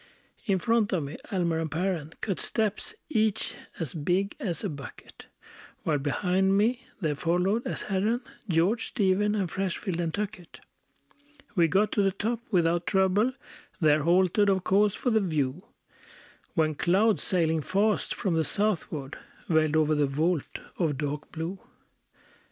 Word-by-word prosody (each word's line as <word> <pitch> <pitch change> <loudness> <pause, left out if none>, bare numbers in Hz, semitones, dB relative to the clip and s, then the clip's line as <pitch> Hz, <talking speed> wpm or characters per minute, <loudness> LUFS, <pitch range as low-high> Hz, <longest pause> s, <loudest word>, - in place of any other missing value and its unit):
In 195 -2 +3
front 225 +1 +1
of 170 -5 +1
me 140 +2 -6
Almer 170 -4 0
and 160 -1 -2
Perren 165 -1 -2
Cut 195 -4 -2
steps, 220 - -1
each 220 -7 +1 0.2
as 160 -7 -3
big 180 +6 0
as 175 -7 -2
a - - -1
bucket; 140 -3 -10 0.6
While 150 -3 +1
behind 190 +7 +1
me 240 +5 +1
there 155 -6 0
followed, 180 - 0
as - - -3
Herren, 210 +5 0 0.3
George, 185 +8 +2
Stephen, 205 -1 +1
and 195 -3 0
Freshfield, 190 0 -3
and 170 -2 -1
Tuckett. 205 -2 -5 0.9
We 175 -6 +4
got 195 +6 +2
to 205 - +2
the 195 - +3
top 220 +4 -2
without 170 -3 +2
trouble; 195 +6 +3 0.5
There 155 -2 +4
halted, 185 +5 +3
of 190 -2 +2
course, 205 +2 +3
for 250 - -1
the 220 -1 +3
view; 155 -3 -1 0.9
When 155 -2 +2
clouds, 195 +8 +2
sailing 160 -3 +1
fast 205 +7 +1
from 190 - -1
the 160 0 +2
southward, 155 -5 -2 0.3
Veiled 155 -2 +3
over 155 -1 +3
the 150 -1 +2
vault 155 +3 -1 0.2
of 155 -6 +1
dark 150 +1 -4
blue. 170 +4 -4
180 Hz, 150 wpm, -28 LUFS, 160-205 Hz, 0.9 s, We